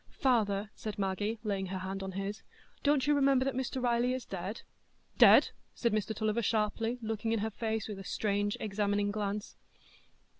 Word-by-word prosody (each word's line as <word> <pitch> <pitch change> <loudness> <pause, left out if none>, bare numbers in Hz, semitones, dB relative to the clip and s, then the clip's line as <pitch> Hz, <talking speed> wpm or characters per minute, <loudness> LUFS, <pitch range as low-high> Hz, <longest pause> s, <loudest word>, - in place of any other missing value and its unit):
"Father," 215 -5 +2
said 215 -1 -6
Maggie, 205 +3 -1
laying 200 -3 -1
her 190 +1 -4
hand 190 +1 -4
on 190 0 -5
his, 195 +3 -4 0.4
"don't 285 -2 +3
you 295 - +4
remember 275 -2 +3
that 270 - 0
Mr 260 +1 -2
Riley 245 0 +2
is 255 -1 -4
dead?" 190 +4 -5 0.6
"Dead?" - - +8 0.2
said 235 -3 0
Mr 215 +1 -1
Tulliver, 215 +2 0
sharply, 225 +2 0
looking 225 0 -1
in 225 - +1
her 220 +1 -1
face 220 0 -2
with 205 -3 -6
a - - -7
strange, 205 +1 -1
examining 205 -1 0
glance. 205 0 -3
215 Hz, 175 wpm, -32 LUFS, 200-235 Hz, 0.6 s, Dead